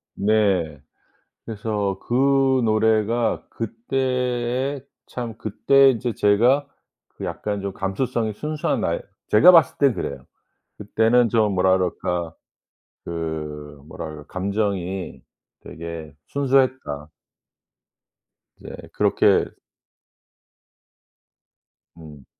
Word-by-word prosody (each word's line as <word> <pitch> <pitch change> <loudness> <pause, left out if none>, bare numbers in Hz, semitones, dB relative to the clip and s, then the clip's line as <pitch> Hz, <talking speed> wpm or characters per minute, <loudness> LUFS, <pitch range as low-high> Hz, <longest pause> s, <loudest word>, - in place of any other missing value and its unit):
네. 100 -8 +1 0.7
그래서 105 -3 -2
그 135 +1 +3
노래가 110 +1 +1
그때에 125 +3 -2 0.3
참 120 -3 -6
그때 135 +5 +4
인제 120 -1 -3
제가 120 +9 +3 0.4
그 - - -11
약간 105 -1 -4
좀 100 0 -3
감수성이 110 +3 -2
순수한 150 +7 -2
나이 - - -1 0.3
제가 110 +12 +8
봤을 165 -3 +5
땐 140 -3 +3
그래요. 65 -10 -5 0.5
그때는 115 +3 +2
좀 105 -2 +2
뭐라 95 0 +3
그럴까 90 -2 -2 0.7
그 75 -3 -6
뭐라 - - -7
그럴 75 -1 -11
감정이 95 -1 -3 0.4
되게 80 -2 -8
순수했다. 130 - 0 1.5
이제 - - -10 0.2
그렇게 - - +3 2.5
음. 75 -4 -13
110 Hz, 180 characters per minute, -22 LUFS, 90-125 Hz, 2.5 s, 제가